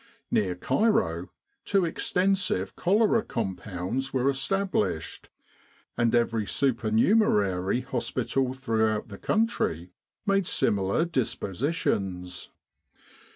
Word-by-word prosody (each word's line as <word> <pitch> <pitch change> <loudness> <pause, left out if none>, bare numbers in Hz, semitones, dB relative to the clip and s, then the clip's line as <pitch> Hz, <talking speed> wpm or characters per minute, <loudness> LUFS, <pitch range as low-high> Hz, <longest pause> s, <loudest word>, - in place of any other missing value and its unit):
Near 95 -4 +1
Cairo 215 - +1 0.3
two 195 -3 +2
extensive 180 - 0
cholera 215 +4 +3
compounds 105 - -3
were 135 +1 +2
established, 135 - -1 0.7
and 120 0 +2
every 115 -3 +1
supernumerary 110 - +2
hospital 130 +1 -1
throughout 110 -4 0
the 100 - -9
country 150 - 0 0.3
made 195 -3 +2
similar 100 - +1
dispositions. 100 - -2
120 Hz, 80 wpm, -27 LUFS, -, 0.7 s, cholera